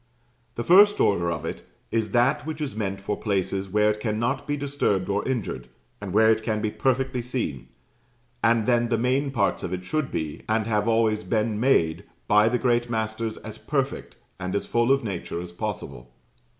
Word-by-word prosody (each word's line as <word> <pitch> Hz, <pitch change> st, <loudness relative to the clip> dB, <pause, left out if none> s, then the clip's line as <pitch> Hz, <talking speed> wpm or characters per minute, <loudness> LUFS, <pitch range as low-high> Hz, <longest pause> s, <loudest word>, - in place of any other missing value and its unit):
The 120 Hz, -, -3 dB
first 205 Hz, -, +6 dB
order 85 Hz, -4 st, +2 dB
of 85 Hz, -, -4 dB
it -, -, -5 dB, 0.3 s
is 110 Hz, -2 st, 0 dB
that 125 Hz, +7 st, +2 dB
which 155 Hz, 0 st, -5 dB
is 145 Hz, -7 st, -4 dB
meant 100 Hz, -3 st, -3 dB
for 100 Hz, +1 st, -2 dB
places 95 Hz, -2 st, -2 dB
where 105 Hz, +2 st, +3 dB
it 105 Hz, -, -5 dB
cannot 115 Hz, +5 st, -1 dB
be 145 Hz, 0 st, -1 dB
disturbed 140 Hz, -10 st, 0 dB
or 100 Hz, +1 st, 0 dB
injured, 110 Hz, -, -3 dB, 0.3 s
and 100 Hz, -2 st, -5 dB
where 110 Hz, +3 st, +5 dB
it 110 Hz, 0 st, +1 dB
can 110 Hz, -1 st, -1 dB
be 105 Hz, 0 st, -1 dB
perfectly 130 Hz, 0 st, 0 dB
seen; 95 Hz, -, -4 dB, 0.8 s
and 115 Hz, 0 st, +3 dB
then 120 Hz, -1 st, +2 dB
the 115 Hz, -, +2 dB
main 130 Hz, +4 st, +1 dB
parts 135 Hz, -3 st, 0 dB
of 90 Hz, -, -4 dB
it 90 Hz, 0 st, -5 dB
should 155 Hz, +5 st, -1 dB
be, 75 Hz, -2 st, -4 dB
and 110 Hz, 0 st, +1 dB
have 105 Hz, -1 st, 0 dB
always 110 Hz, -2 st, +2 dB
been 110 Hz, -1 st, -1 dB
made, 85 Hz, -11 st, +2 dB, 0.2 s
by 105 Hz, +1 st, +5 dB
the 125 Hz, -, +1 dB
great 120 Hz, -1 st, +1 dB
masters, 110 Hz, 0 st, -2 dB
as -, -, -9 dB
perfect, -, -, -2 dB, 0.2 s
and 90 Hz, +1 st, -3 dB
as 100 Hz, -, -1 dB
full 120 Hz, +2 st, +2 dB
of 135 Hz, -1 st, +3 dB
nature 95 Hz, -5 st, -4 dB
as 90 Hz, 0 st, -7 dB
possible. 85 Hz, -, -6 dB
110 Hz, 190 wpm, -25 LUFS, 100-125 Hz, 0.8 s, first